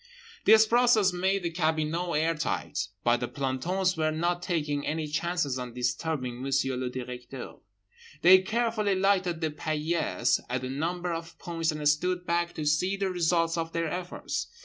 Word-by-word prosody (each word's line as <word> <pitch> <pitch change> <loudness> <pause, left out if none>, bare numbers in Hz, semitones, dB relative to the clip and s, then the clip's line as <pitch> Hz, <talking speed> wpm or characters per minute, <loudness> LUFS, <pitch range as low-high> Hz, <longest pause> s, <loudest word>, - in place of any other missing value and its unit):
This 220 +1 +8
process 225 -4 +4
made 190 +2 0
the 170 - -1
cabinot 160 +1 0
air 160 +2 +2
tight. 100 - -2 0.2
But 120 0 +4
the 120 0 -3
plantons 170 +9 -1
were 155 -1 +1
not 175 +3 -1
taking 150 -5 -1
any 155 +1 -2
chances 155 -3 -1
on 125 -1 -6
disturbing 125 0 -2
Monsieur 135 -1 0
le 125 0 -2
Directeur. 125 0 -7 0.7
They 185 +2 +9
carefully 215 0 0
lighted 185 -3 +1
the 160 -1 0
paillasse 155 -3 0
at 125 +1 -2
a 130 - -3
number 175 +5 -2
of 165 0 -7
points 165 -1 -2
and 150 -1 -2
stood 180 +4 +1
back 170 0 0
to 155 - -4
see 180 +7 +1
the 195 -1 -1
results 170 -1 +1
of 165 0 -4
their 165 -1 -1
efforts. 180 +2 -4
165 Hz, 165 wpm, -28 LUFS, 145-180 Hz, 0.7 s, They